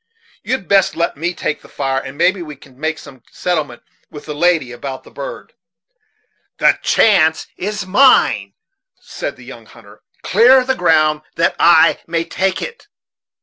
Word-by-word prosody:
You'd 255 Hz, -7 st, -3 dB
best 195 Hz, -1 st, +2 dB
let 170 Hz, 0 st, -1 dB
me 170 Hz, +5 st, -2 dB
take 155 Hz, -, -3 dB
the -, -, -17 dB
fire, 135 Hz, -1 st, -2 dB
and 135 Hz, +1 st, -10 dB
maybe 185 Hz, +3 st, +2 dB
we 150 Hz, -3 st, -8 dB
can 135 Hz, -1 st, -20 dB
make 155 Hz, +1 st, -2 dB
some 135 Hz, -4 st, -14 dB
settlement 155 Hz, -9 st, -3 dB, 0.3 s
with 150 Hz, -1 st, -11 dB
the 150 Hz, -, -5 dB
lady 160 Hz, -4 st, +1 dB
about 130 Hz, +2 st, -7 dB
the -, -, -17 dB
bird." -, -, -8 dB, 1.0 s
"The -, -, +3 dB
chance 160 Hz, -7 st, +3 dB
is 205 Hz, 0 st, -4 dB
mine," 255 Hz, +8 st, +3 dB, 0.5 s
said -, -, -6 dB
the -, -, -16 dB
young -, -, -12 dB
hunter. -, -, -18 dB, 0.2 s
"Clear 255 Hz, +2 st, +5 dB
the 265 Hz, -, +1 dB
ground, 155 Hz, -8 st, +2 dB
that 165 Hz, -, +1 dB
I 170 Hz, -1 st, +5 dB
may 165 Hz, 0 st, -1 dB
take 190 Hz, +2 st, -2 dB
it." 480 Hz, -1 st, -9 dB
165 Hz, 160 wpm, -17 LUFS, 150-195 Hz, 1.0 s, Clear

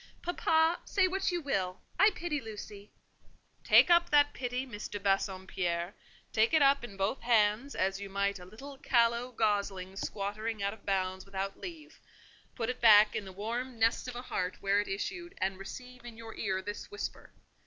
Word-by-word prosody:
"Papa, 325 Hz, -1 st, +2 dB
say 380 Hz, -2 st, +2 dB
what 385 Hz, +1 st, 0 dB
you 350 Hz, -1 st, -1 dB
will, 190 Hz, -, -2 dB, 0.2 s
I 405 Hz, +3 st, +8 dB
pity 305 Hz, -4 st, -2 dB
Lucy." 210 Hz, -2 st, -9 dB, 0.7 s
"Take -, -, +6 dB
up 345 Hz, 0 st, +5 dB
that 290 Hz, -1 st, +4 dB
pity, 250 Hz, +1 st, -3 dB
Miss 215 Hz, -5 st, -7 dB
de 205 Hz, -, -5 dB
Bassompierre; 190 Hz, -2 st, -1 dB, 0.4 s
take 225 Hz, +8 st, +3 dB
it 305 Hz, -, +5 dB
up 275 Hz, -1 st, +4 dB
in 200 Hz, -5 st, -8 dB
both 195 Hz, +7 st, -1 dB
hands, 230 Hz, +3 st, +2 dB
as 195 Hz, +1 st, 0 dB
you 200 Hz, -, -6 dB
might 200 Hz, 0 st, -1 dB
a 180 Hz, -, -11 dB
little 270 Hz, +8 st, -11 dB
callow 235 Hz, 0 st, +2 dB
gosling 200 Hz, -4 st, -1 dB
squattering 210 Hz, +2 st, -3 dB
out 200 Hz, -, 0 dB
of 220 Hz, -, -17 dB
bounds 190 Hz, -1 st, -1 dB
without 195 Hz, 0 st, -5 dB
leave; 330 Hz, -5 st, -9 dB, 0.6 s
put 230 Hz, -3 st, -2 dB
it 250 Hz, +1 st, -4 dB
back 215 Hz, -2 st, +7 dB
in 205 Hz, -, -3 dB
the 190 Hz, -, -8 dB
warm 235 Hz, +6 st, -4 dB
nest 225 Hz, +2 st, +2 dB
of 250 Hz, -, -6 dB
a 245 Hz, -, -6 dB
heart 185 Hz, -6 st, -3 dB
whence 200 Hz, +1 st, +1 dB
it -, -, -5 dB
issued, 345 Hz, -, -4 dB
and 190 Hz, 0 st, -2 dB
receive 250 Hz, +5 st, -9 dB
in 235 Hz, -2 st, -10 dB
your 225 Hz, -1 st, -9 dB
ear 190 Hz, -2 st, -2 dB
this 205 Hz, +1 st, -6 dB
whisper. 415 Hz, +1 st, -6 dB
220 Hz, 185 wpm, -31 LUFS, 195-260 Hz, 0.7 s, I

